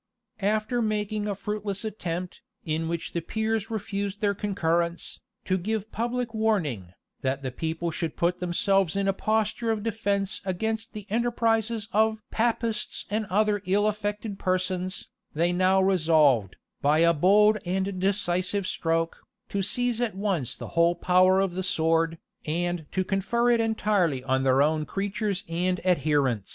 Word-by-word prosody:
After 215 +4 +1
making 210 -1 -1
a 205 - -1
fruitless 205 +1 -4
attempt, 180 -4 -4 0.2
in 160 0 -1
which 170 0 -4
the 170 - -1
peers 220 +4 -2
refused 205 -2 -3
their 205 -2 +2
concurrence, 170 -4 -1 0.3
to 185 -1 +1
give 220 +3 -3
public 240 0 -2
warning, 160 - 0 0.3
that 135 +1 -1
the 130 - -3
people 165 +5 -3
should 160 -1 -3
put 175 +1 +1
themselves 185 0 +1
in 200 0 0
a 195 - +3
posture 220 +3 0
of 220 -2 0
defence 200 -3 -1
against 220 +4 -2
the 210 -2 -7
enterprises 230 -1 +1
of 220 +1 +2
"Papists 230 -1 -1
and 215 0 -1
other 205 +1 +2
ill 200 +3 +3
affected 210 -1 -2
persons,"[] 185 0 -1 0.3
they 170 +3 +2
now 185 +1 +3
resolved, 155 - +3 0.3
by 145 +2 +3
a 170 +1 +5
bold 210 +6 +5
and 190 +1 -2
decisive 190 0 0
stroke, 165 -2 -1 0.3
to 200 - -1
seize 245 +4 0
at 230 -5 -1
once 190 - -1
the - - -8
whole 170 +1 +3
power 185 +2 +4
of 195 -2 0
the 185 - -2
sword, 165 -2 +1 0.3
and 175 0 -1
to 185 - 0
confer 205 +6 +1
it 235 - +3
entirely 205 - +1
on 130 0 +1
their 135 +1 +4
own 155 +1 +1
creatures 200 +2 -2
and 180 +2 0
adherents. 145 - +1
195 Hz, 150 wpm, -26 LUFS, 170-215 Hz, 0.3 s, a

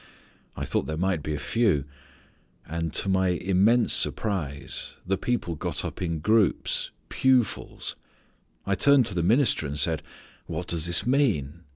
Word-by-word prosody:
I - - -3
thought - - -1
there 80 - -3
might 90 -2 0
be 75 +1 -3
a - - -3
few. 100 - +1 0.8
And 85 0 -4
to - - +1
my 95 -1 +2
immense 95 +6 +3
surprise 75 -10 +1
the 95 +2 +1
people 110 -5 -2
got 75 - -3
up - - -6
in 85 -3 -2
groups, 105 +5 +1 0.2
pew 130 -2 +3
fulls. - - -6 0.7
I 100 - 0
turned 135 +6 +4
to 105 - +1
the 90 - -1
minister 105 - +2
and 70 +1 -5
said, 75 +1 +1 0.5
'What - - -4
does 85 -1 +1
this 85 +1 +1
mean?' 90 - 0
90 Hz, 160 wpm, -26 LUFS, 80-110 Hz, 0.8 s, turned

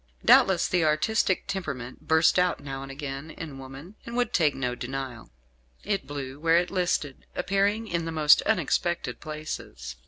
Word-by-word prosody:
Doubtless 190 -3 +6
the 180 -2 +1
artistic 185 +6 +1
temperament 140 -10 -5
burst 160 +2 +4
out 180 -1 +2
now 135 -1 -6
and 135 0 -7
again 140 +1 -6
in 155 -3 -8
woman, 135 +7 -10
and 235 - -7
would 245 -2 0
take 155 -5 +3
no 125 -2 -2
denial. 125 - -6 0.5
It 200 -2 -2
blew 140 -1 -6
where 165 +1 +4
it 175 +1 +1
listed, 175 -7 -1
appearing 200 +4 +1
in 170 -4 -2
the 165 - -3
most 155 -2 +5
unexpected 175 -5 0
places. 65 - -7
155 Hz, 160 wpm, -27 LUFS, 135-180 Hz, 0.5 s, Doubtless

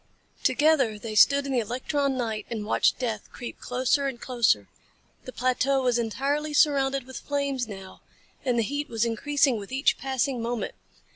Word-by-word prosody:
Together 285 -8 +3
they 215 +1 -6
stood 280 +7 +5
in 275 - -3
the 255 - +2
electron 260 +4 -1
night 220 -4 -3
and 220 -3 -4
watched - - +2
death 225 -5 -3
creep 240 - -8
closer 260 +3 0
and 260 -3 -5
closer. 230 - +1 0.6
The 255 - -7
plateau 255 +2 +1
was 245 -1 +2
entirely 285 +6 -1
surrounded 275 -2 +3
with 260 0 -8
flames 280 -4 -2
now 195 -3 -10 0.4
and 250 -3 +1
the 230 - +3
heat 285 +6 -3
was 230 0 0
increasing 265 +2 +1
with 200 +2 -9
each 270 +2 +2
passing 265 -1 -1
moment. 235 0 -3
255 Hz, 165 wpm, -26 LUFS, 230-275 Hz, 0.6 s, stood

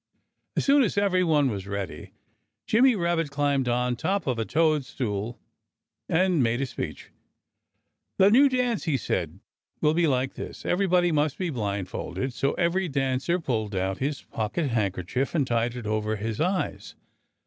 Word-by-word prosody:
As - - 0
soon 285 +1 +5
as 210 -5 0
everyone 180 -9 +3
was 100 -2 -5
ready, 100 -3 -5 0.5
Jimmy 250 +2 +4
Rabbit 170 -4 0
climbed 140 -2 0
on 125 0 +1
top 195 +11 -1
of 125 -4 -1
a 115 - 0
toadstool 125 -8 0 0.7
and 180 -2 +3
made 120 0 +1
a 135 - 0
speech. 125 - -6 1.1
"The 195 +1 +6
new 275 +5 +6
dance," 250 -5 0
he 155 -5 +1
said, 85 -6 -3 0.4
"will 150 0 +3
be 170 0 +2
like 130 -1 0
this: - - -8
Everybody 180 -1 +2
must 150 -2 +1
be 180 -3 -2
blindfolded." 105 +3 -3
So 135 +3 0
every 180 +2 +1
dancer 135 +5 0
pulled 110 - -2
out 95 +1 -1
his 140 +1 -2
pocket 120 +7 -2
handkerchief 105 - -1
and 145 -5 +2
tied 120 0 0
it 120 -3 -6
over 110 0 -1
his 110 +3 -3
eyes. 185 +2 -2
135 Hz, 155 wpm, -26 LUFS, 115-175 Hz, 1.1 s, The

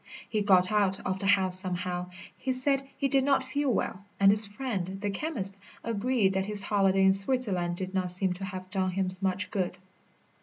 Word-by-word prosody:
He 215 -2 -2
got 185 -2 +3
out 200 -3 +1
of 190 0 -2
the 195 - -3
house 190 -2 +2
somehow. 180 -1 -4 0.3
He 260 0 -3
said 270 +1 0
he 275 - 0
did 270 0 +1
not 275 -1 +1
feel 275 +2 -2
well, 200 -4 -2 0.2
and 195 0 +6
his 210 +1 +9
friend, 200 -5 -5
the 205 0 -3
chemist, 200 -5 -3 0.3
agreed 230 -2 0
that 190 0 -2
his 210 -1 +6
holiday 195 -2 +1
in 190 0 +5
Switzerland 195 -5 +2
did 185 +1 -4
not 185 -1 -1
seem 180 +1 +2
to 190 +2 -7
have 185 -1 -8
done 190 -2 -1
him 185 0 -2
much 190 0 -2
good. 185 -3 -3
195 Hz, 195 wpm, -27 LUFS, 185-220 Hz, 0.3 s, his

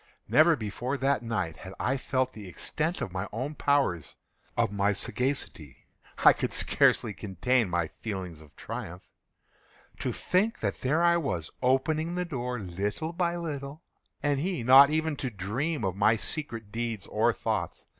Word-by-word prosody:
Never 160 +2 +6
before 120 +4 -3
that 135 +1 +1
night 100 -9 -2
had 95 +1 -10
I 135 - +1
felt 130 -1 -1
the 105 -3 -9
extent 160 - -2
of 90 - -3
my 95 - -3
own 130 +7 -3
powers—of 120 - -1
my 100 0 +2
sagacity. 105 - -3 0.4
I - - +10
could - - -3
scarcely 105 - +3
contain 105 +4 0
my 85 -2 0
feelings 95 -7 -5
of 75 -2 -18
triumph. 90 +2 -7 1.0
To - - -1
think 205 +5 0
that - - -2
there 150 +6 +2
I 170 0 +5
was, 90 - -2
opening 155 +6 +1
the 180 0 -1
door, 125 -6 -3
little 105 - -3
by 170 -1 0
little, 145 -2 -5 0.4
and 145 -2 +2
he 175 -4 -2
not 135 +3 +9
even 155 -1 0
to 130 - -2
dream 115 - -2
of 95 -1 -1
my 105 +3 +4
secret 115 -4 -4
deeds 115 -4 -3
or - - +2
thoughts. - - -3
125 Hz, 155 wpm, -28 LUFS, 100-150 Hz, 1.0 s, I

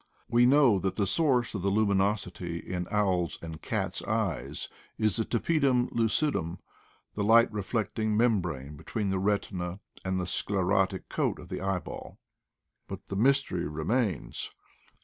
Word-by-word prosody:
We 120 +1 +4
know 130 -7 +5
that 95 0 -1
the 100 - +1
source 125 - +2
of 100 - -3
the 100 - +1
luminosity 100 -4 0
in 90 0 -4
owls' 95 -5 +1
and 80 -2 -8
cats' - - -2
eyes - - -2 0.3
is 110 -3 +2
the 115 - +2
tapedvm 130 -1 +2
lucidum 115 - 0 0.3
— - - -35
the 105 - -2
light 115 +2 +5
reflecting 110 +1 -1
membrane 90 - 0
between 95 +7 -3
the 95 - 0
retina 95 -2 -1 0.2
and 95 0 -1
the 90 - -1
sclerotic 95 +1 0
coat - - -1
of - - -12
the - - -4
eyeball; 95 -2 -4 0.7
but - - -8
the - - -3
mystery 125 - +2
remains. 85 - -1
100 Hz, 145 wpm, -29 LUFS, 90-115 Hz, 0.7 s, know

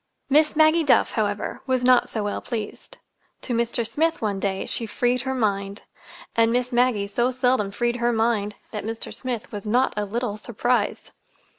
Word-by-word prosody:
Miss 305 +3 +4
Maggie 315 +2 +5
Duff, 285 - +4
however, 205 -2 -2
was 255 -1 +1
not 250 0 +4
so 220 - -3
well 205 - -3
pleased. 220 -4 -6 0.4
To 250 - -3
Mr. 235 0 0
Smith, 320 +8 0
one 205 -3 -1
day, 195 -1 -1
she 230 - -3
freed 245 +3 0
her 265 0 -2
mind—and 205 +1 -2
Miss 250 +1 0
Maggie 240 -4 +2
so 240 +5 0
seldom 250 -5 +1
freed 240 +4 -1
her 240 0 +1
mind 220 -3 0 0.2
that 210 - -4
Mr. 225 +1 -5
Smith 245 -4 -5
was 205 0 -6
not 250 +5 +2
a 210 0 -1
little 220 0 -3
surprised. 240 0 -1
235 Hz, 170 wpm, -24 LUFS, 210-250 Hz, 0.4 s, Maggie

